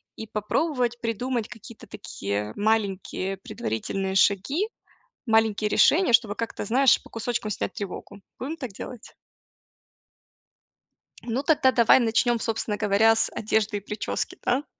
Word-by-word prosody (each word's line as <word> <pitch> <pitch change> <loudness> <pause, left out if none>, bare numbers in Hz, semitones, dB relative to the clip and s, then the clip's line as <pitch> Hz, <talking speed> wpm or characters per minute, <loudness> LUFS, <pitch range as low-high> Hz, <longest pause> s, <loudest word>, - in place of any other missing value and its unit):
и 220 - -8
попробовать 240 +3 -1
придумать 235 0 -2
какие-то 220 +1 -12
такие 105 - -4
маленькие 200 -3 -1
предварительные 190 - -4
шаги, 270 - +2 0.6
маленькие 220 -2 +2
решения, 315 - +4
чтобы 225 -3 +4
как-то, 230 -2 -4
знаешь, 260 +4 +4
по - - -15
кусочкам 225 -1 -3
снять - - -3
тревогу. 200 0 -7 0.2
Будем 295 +6 -4
так 255 -8 -6
делать? 225 +4 -9 2.1
Ну, 245 +4 -2
тогда 280 -4 +4
давай 235 0 +5
начнём, 235 +1 +2
собственно 220 -2 -2
говоря, 215 +2 +4
с 225 - +1
одежды 215 -1 0
и - - -4
причёски, 210 +2 -4
да. 270 +4 0
225 Hz, 125 wpm, -25 LUFS, 205-245 Hz, 2.1 s, давай